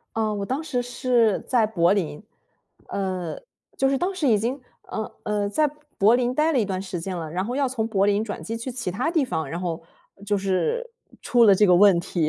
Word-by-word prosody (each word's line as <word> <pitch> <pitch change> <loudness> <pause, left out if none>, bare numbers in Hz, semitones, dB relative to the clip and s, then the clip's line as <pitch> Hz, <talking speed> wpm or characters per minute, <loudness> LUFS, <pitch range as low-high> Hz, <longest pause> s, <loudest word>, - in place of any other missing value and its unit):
嗯， 215 -2 0
我 200 - -2
当 265 +7 -2
时 255 -6 -2
是 245 -3 +1
在 235 -4 +2
柏 175 -5 +2
林， 175 -6 -2 0.7
呃， 185 -4 -3 0.4
就 270 - +2
是 275 - +2
当 375 +2 -1
时 330 -6 -1
已 220 -3 +4
经， 245 +6 -2 0.3
嗯， 220 -1 -4
呃， 210 -2 -1
在 300 +9 +2 0.3
柏 215 +2 +5
林 250 0 0
待 310 +4 +2
了 275 - +2
一 225 - +2
段 190 -2 -3
时 190 -2 -5
间 185 +2 -4
了， 160 -2 -5
然 180 +4 -2
后 240 +4 -3
要 275 0 +1
从 235 -3 -2
柏 200 -3 +1
林 205 +1 +2
转 205 -2 -6
机 225 - -4
去 230 +3 -5
其 240 -6 -4
它 200 - -1
地 325 -5 +2
方， 160 - -3
然 170 +5 -4
后 170 -3 -3 0.4
就 205 0 +1
是 200 - -1 0.3
出 240 -1 +4
了 200 -3 +7
这 210 +2 +4
个 180 - +6
问 190 0 +6
题。 170 -3 -1
210 Hz, 245 characters per minute, -24 LUFS, 190-250 Hz, 0.7 s, 了